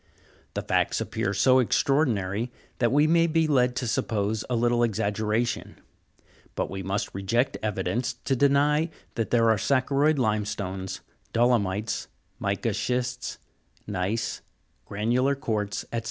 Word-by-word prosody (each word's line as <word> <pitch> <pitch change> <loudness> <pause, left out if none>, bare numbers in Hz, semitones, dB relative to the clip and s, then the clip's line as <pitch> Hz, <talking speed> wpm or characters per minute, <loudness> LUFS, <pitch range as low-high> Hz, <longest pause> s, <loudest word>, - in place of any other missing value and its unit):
The - - -2
facts - - +1
appear 100 - -2
so 130 +7 +4
extraordinary, 120 -5 +1 0.3
that 120 -2 +2
we 145 +3 +4
may 165 +1 +4
be 165 0 +2
led 125 -5 +2
to 125 - -2
suppose 110 -1 -1
a 125 - +1
little 120 +1 +2
ex 110 -3 0
aggeration: 110 +2 -1 0.8
but - - -2
we 95 0 -4
must 95 +2 -2
reject 115 +7 0
evidence 115 +3 -1
to 130 +2 -2
deny 145 +4 +3 0.2
that 115 -1 -2
there 115 -2 +4
are 110 - +2
saccharoid 140 +4 +2
limestones, 100 -5 -2 0.3
dolomites, 110 -3 +1 0.3
mica 100 +3 -1
schists, 125 +3 -2 0.5
gneiss, 100 +3 -2 0.4
granular 120 +7 +1
quartz, 110 -7 -2
&c. 115 - +1
115 Hz, 130 wpm, -26 LUFS, 105-130 Hz, 0.8 s, so